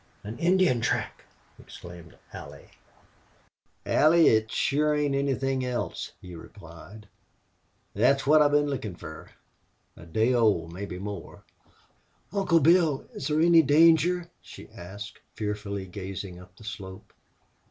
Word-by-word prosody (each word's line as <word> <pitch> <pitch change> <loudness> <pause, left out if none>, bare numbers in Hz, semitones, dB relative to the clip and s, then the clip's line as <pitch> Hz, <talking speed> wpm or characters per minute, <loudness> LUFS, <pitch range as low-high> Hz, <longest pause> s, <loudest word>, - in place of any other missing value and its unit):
"An 110 +3 -8
Indian 175 -8 +2
track!" - - -2 0.3
exclaimed 85 -2 -12 0.2
Allie. - - -11 1.1
"Allie, 165 +2 +5
it 110 0 +1
sure 150 +2 +1
ain't 145 -1 0
anythin' 135 -1 -1
else," 125 -1 -4
he 90 -1 -11
replied. 90 +4 -13 0.9
"Thet 120 +7 +4
is - - -10
what 155 +2 +5
I've 145 - +5
been 145 0 +3
lookin' 125 -10 -4
fer.... 80 -2 -10 0.7
A 85 - -14
day 110 +9 +1
old 105 -9 +1
mebbe 90 -1 -6
more." 100 -2 -8 0.9
"Uncle 190 -5 +2
Bill, 160 -2 +3
is 135 - -5
there 155 0 +1
any 170 0 +6
danger?" 165 +4 +4
she - - -13
asked, 100 +5 -10 0.2
fearfully 105 -2 -4
gazing 95 -1 -7
up 90 0 -16
the - - -15
slope. 95 -3 -9
115 Hz, 130 wpm, -27 LUFS, 95-150 Hz, 1.1 s, any